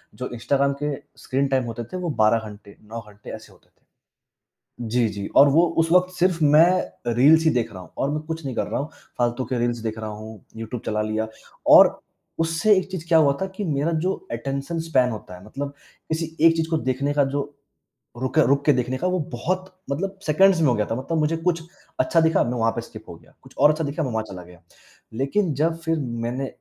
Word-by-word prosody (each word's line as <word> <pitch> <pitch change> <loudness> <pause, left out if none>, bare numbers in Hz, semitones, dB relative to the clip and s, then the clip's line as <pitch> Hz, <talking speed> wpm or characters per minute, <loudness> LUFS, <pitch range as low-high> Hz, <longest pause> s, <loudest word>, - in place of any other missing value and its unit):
जो 125 +4 -5
इंस्टाग्राम 140 +4 +1
के 150 -1 -1 0.3
screen 135 +2 0
time 135 -1 +1
होते 120 0 -5
थे - - -2
वह 175 -3 -2
12 110 +1 +4
घंटे, 100 -1 -14
9 115 +2 -7
घंटे 105 0 -13
ऐसे - - -14
होते - - -26
थे। - - -42 1.1
जी, 120 0 +2
जी 100 -1 -5
और 140 - +8
वो 160 +5 +5 0.2
उस 165 0 +2
वक़्त 180 0 +4
सिर्फ 180 -1 +1
मैं 150 -4 +3
रील्स 155 +7 +5
ही 160 - +5
देख 120 -6 0
रहा 95 - -9
हूँ 90 - -15
और 140 - 0
मैं 150 - -2
कुछ 160 -1 -5
नहीं 130 - -4
कर - - 0
रहा - - -2
हूँ। 145 +3 -5 0.3
फालतू 120 +1 0
के 125 -2 -2
रील्स 120 0 0
देख 110 -1 -4
रहा 110 -1 -5
हूँ, 110 0 -10
यूट्यूब 115 +1 -6
चला 105 0 0
लिया 110 +1 -2 0.5
और - - +7 0.4
उससे 165 +6 +3
एक 190 0 -4
चीज़ 175 -3 -6
क्या 165 -1 +6
हुआ 145 -3 +5
था - - 0
कि 205 - -3
मेरा 150 0 0
जो 190 - +2 0.2
अटेंशन 135 +7 -3
स्पैन 135 -6 +2
होता 105 -5 -8
है 90 - -15
मतलब 140 +5 -5 0.4
किसी 160 0 -3
एक 165 0 +5
चीज़ 160 0 -1
को 160 - +2
देखने 140 +1 -1
का 145 -1 +3
जो 145 - 0 0.8
रुके 155 +3 +2
रुक 140 +1 +2
के 150 - +6
देखने 125 0 -1
का 180 - -1
वह 180 -4 -1
बहुत 185 +9 -3 0.2
मतलब 195 +6 -3
सेकंड्स 180 +4 +4
में 150 - +4
हो 125 - +3
गया 105 -1 0
था। - - +1
मतलब 140 +6 -2
मुझे 155 +2 +1
कुछ 165 0 -1 0.4
अच्छा 165 - +3
दिखा, 160 0 +3
मैं 120 +1 -2
वहाँ 115 0 +2
पे 115 - -3
स्किप 110 -1 -12
हो - - -8
गया 80 -2 -22
कुछ - - -17
और 150 - +6
अच्छा 155 +1 -1
दिखा, 145 +3 -2
मैं 135 - -2
वहाँ 110 0 -1
चला 90 -2 -8
गया। 90 -1 -16 0.5
लेकिन 150 - 0
जब 160 +4 +1
फिर 165 -1 -1 0.3
मैंने 125 +3 -2
140 Hz, 230 wpm, -23 LUFS, 115-165 Hz, 1.1 s, और